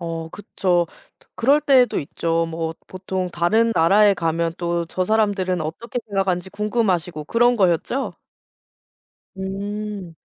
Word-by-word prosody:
어 165 -1 -4
그쵸. 180 -4 0 0.5
그럴 280 +6 +3
때도 265 -4 +4
있죠. 165 +3 -1
뭐 165 0 -3
보통 185 0 -4
다른 220 +8 +2
나라에 200 +5 +5
가면 165 -1 -1
또 170 -1 -1
저 185 +2 -1
사람들은 200 -4 +1
어떻게 215 +11 -4
생각하는지 190 -2 -1
궁금하시고 185 -8 -1
그런 240 +6 +3
거였죠? 190 +7 +1 1.2
음. 200 -1 -5
185 Hz, 255 characters per minute, -22 LUFS, 170-210 Hz, 1.2 s, 나라에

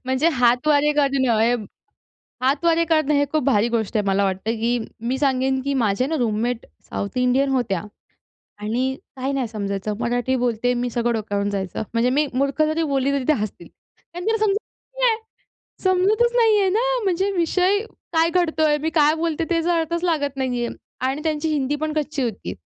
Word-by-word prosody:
म्हणजे 260 +5 +2
हातवारे 285 +4 +3
करणं 270 -5 +2
हे 235 +2 +3 0.9
हातवारे 330 +5 +2
करणं 310 -3 +2
हे 285 0 +3
खूप 310 -1 +1
भारी 235 -4 +3
गोष्ट 230 -1 -1
आहे. 210 - +1
मला 195 +1 +2
वाटतं, 190 +3 -1
की 240 +1 +1 0.2
मी 245 +3 -2
सांगेन, 265 -1 +1
की 280 0 -1
माझ्या 230 0 +1
ना 320 +2 -1
रूममेट 230 +1 -1 0.2
साऊथ 200 +6 -3
इंडियन 255 +2 +2
होत्या. 230 -9 0 0.8
आणि 245 +5 -1 0.2
काही 265 +1 -2
नाही 265 -4 -1
समजायचं 200 -1 -3
मराठी 245 +2 0
बोलते 245 +1 +1
मी 245 0 -1
सगळं 240 0 0
डोक्यावरून 205 -2 -2
जायचं. 195 0 -3
म्हणजे 230 +2 +2
मी 290 +3 +2
मूर्ख 275 +4 0
जरी 310 +1 +1
बोलली 275 0 +1
तरी 275 -2 0
ते 310 - +5
हसतील. 215 -6 -4
कारण 350 +1 -13
त्यांना 445 +1 +2
समजतचं 430 +4 -4
नाही. 480 -3 +4 0.7
समजतच 400 +6 +3
नाही 450 -3 +4
आहे 390 -1 +3
ना. 430 +5 +1 0.2
म्हणजे 385 +1 +1
विषय 365 +4 +2 0.3
काय 330 0 +3
घडतोय 315 -4 +2
मी 320 - 0
काय 300 -1 +5
बोलते 330 -1 -1
त्याचा 340 +1 +1
अर्थच 335 +2 -2
लागत 285 -6 0
नाही 250 -2 -1
आहे. - - -6 0.3
आणि 270 +3 -2
त्यांची 315 0 -1
हिंदी 290 -1 0
पण 310 +1 -3
कच्ची 300 -3 -2
होती 195 - -4
275 Hz, 175 wpm, -22 LUFS, 240-320 Hz, 0.9 s, ते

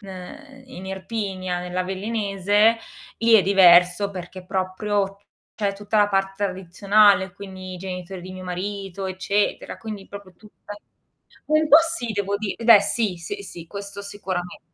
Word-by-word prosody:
ehm, 260 +9 -11
in 190 -8 -10
Irpinia, 190 -2 -4
nell'Avellinese, 200 +3 +1 0.4
lì 230 0 +4
è 205 - +7
diverso 180 +1 +5
perché 185 0 -8
proprio 195 +1 -2 0.4
c'è 200 -2 -1
tutta 205 +2 -3
la 205 0 +4
parte 195 0 -1
tradizionale, 195 +1 +3
quindi 185 -1 -9
i - - -7
genitori 180 0 -6
di 185 +1 -9
mio 185 0 -9
marito, 195 +1 -5
eccetera, 190 +2 -1
quindi 215 -3 -7
proprio 200 -3 -11
tutta 210 -1 -12 0.7
un 310 0 +3
po' 300 - +9
sì 330 -8 0
devo 200 -1 -1
di 215 -2 -3
beh 225 -3 +9
sì, 205 -3 -1
sì, 400 - -6
sì, 170 - -10
questo 200 +1 -7
sicurame 190 -3 -5
195 Hz, 145 wpm, -23 LUFS, 185-210 Hz, 0.7 s, po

